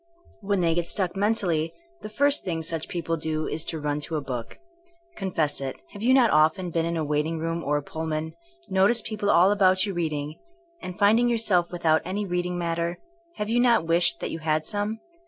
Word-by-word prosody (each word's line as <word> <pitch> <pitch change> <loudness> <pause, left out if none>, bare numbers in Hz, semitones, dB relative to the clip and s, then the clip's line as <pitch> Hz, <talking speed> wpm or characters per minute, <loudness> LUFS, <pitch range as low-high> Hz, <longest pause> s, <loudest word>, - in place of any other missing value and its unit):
When 200 -2 0
they 165 -1 +2
get 170 0 -1
stuck 185 -2 -1
men 205 +3 +2
tally, 165 -6 0 0.3
the 215 - -7
first 285 +6 +2
thing 165 -3 -3
such 160 0 -2
people 165 -1 -3
do 155 0 -2
is 155 +1 -2
to 165 - -4
run 150 0 -2
to 160 +2 -3
a - - 0
book. 125 -4 -6 0.6
Confess 165 -8 -1
it, 135 -1 -5
have 205 - -10
you 240 +3 +3
not 255 -4 +5
often 160 +4 +2
been 165 0 0
in 170 0 -2
a 160 - -1
waiting 150 +2 -1
room 165 +1 -3
or 145 +1 +1
a 145 - -4
Pullman, 160 +1 -4 0.3
noticed 195 +4 +3
people 210 -2 -2
all 180 +2 +5
about 190 -1 +3
you 200 - -3
reading, 155 -3 -3 0.4
and 180 -1 -7
finding 220 +4 +4
yourself 205 -7 +1
with 175 -1 -7
out 160 0 +4
any 200 +3 -3
reading 180 -1 -2
matter, 170 0 -2 0.4
have 210 - -3
you 235 +2 +2
not 240 -8 +4
wished 165 -5 +3
that - - -3
you 165 - -5
had 155 0 0
some! 210 +2 -2
170 Hz, 210 wpm, -25 LUFS, 160-200 Hz, 0.6 s, not